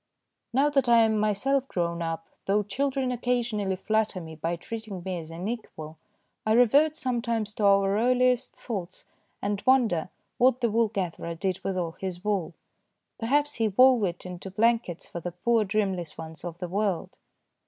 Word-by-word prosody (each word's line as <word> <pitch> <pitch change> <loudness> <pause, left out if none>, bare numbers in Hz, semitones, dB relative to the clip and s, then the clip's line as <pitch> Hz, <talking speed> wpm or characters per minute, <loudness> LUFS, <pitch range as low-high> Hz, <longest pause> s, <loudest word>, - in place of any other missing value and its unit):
Now 280 +4 +3
that 275 -4 +2
I 235 -1 +7
am 220 -1 +2
myself 255 +6 +1
grown 170 -4 -2
up, 165 0 -3 0.2
though 205 +2 +3
children 265 +5 -1
occasionally 235 -5 -1
flatter 215 +1 0
me 160 -2 -9
by 165 +2 -2
treating 210 0 -7
me 185 -1 -3
as 160 -1 -9
an 170 +4 -5
equal, 160 -9 -6 0.4
I 215 - +2
revert 280 +7 +5
sometimes 235 -6 -1
to 210 - -1
our 195 0 +4
earliest 250 +2 +2
thoughts 190 -6 -6 0.4
and 205 0 -1
wonder 230 -11 +3 0.3
what 255 0 +4
the 235 -3 +1
wool 230 +1 +3
gatherer 180 -4 -4
did 190 +1 -2
with 195 -1 -2
all 170 -2 -3
his 185 -1 -5
wool. 195 -6 -1 0.6
Perhaps 290 +5 +1
he 225 - +4
wove 250 +3 +5
it 175 0 -4
into 180 +1 -7
blankets 220 -3 +1
for 170 - -7
the 175 +1 -5
poor 225 +5 +2
dreamless 195 -5 -1
ones 160 0 -8
of 170 -1 -6
the 180 0 -4
world. 195 -1 -2
210 Hz, 170 wpm, -27 LUFS, 180-235 Hz, 0.6 s, I